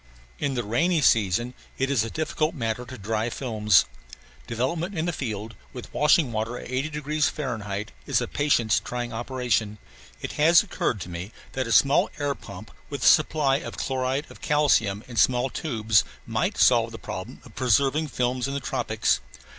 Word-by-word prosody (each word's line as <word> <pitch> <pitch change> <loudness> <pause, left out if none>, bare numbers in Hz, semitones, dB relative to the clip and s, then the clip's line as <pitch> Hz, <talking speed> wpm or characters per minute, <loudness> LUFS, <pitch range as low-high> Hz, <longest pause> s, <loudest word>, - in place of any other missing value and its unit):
In 140 -2 -1
the 120 - -1
rainy 160 - +1
season 115 -2 +2 0.2
it 135 +1 0
is 125 -6 +2
a 115 - -4
difficult 155 +2 -1
matter 115 -2 -2
to 130 +2 -9
dry 110 +2 -2
films. 110 - +2 0.6
Development 160 - -2
in 160 - 0
the 175 - -1
field, 110 -5 -4 0.2
with 125 -3 -9
washing 150 -2 +3
water 110 +2 -2
at - - -9
80 135 +4 -1
degrees 150 0 0
F., 105 -8 -3 0.2
is - - +2
a - - -2
patience 120 -7 +2
trying 120 -1 -5
operation. 115 -3 -1 0.4
It - - -5
has 165 +3 +7
occurred 145 - -2
to 90 - -6
me 90 +4 -6 0.2
that 130 -2 -2
a - - -3
small 135 +6 +4
air 145 -1 0
pump 100 -4 -11 0.2
with 140 -3 -5
a - - +1
supply 150 -3 +4
of 165 - -7
chloride 130 +2 -1
of - - -14
calcium 115 -9 +2
in 120 -2 -9
small 125 +1 +3
tubes 110 -8 +1 0.2
might - - -1
solve - - +4
the - - -7
problem - - -7
of - - -14
preserving 135 +5 +2
films 125 -1 -1
in 140 - -3
the - - -1
tropics. - - 0
125 Hz, 180 wpm, -25 LUFS, 110-145 Hz, 0.6 s, has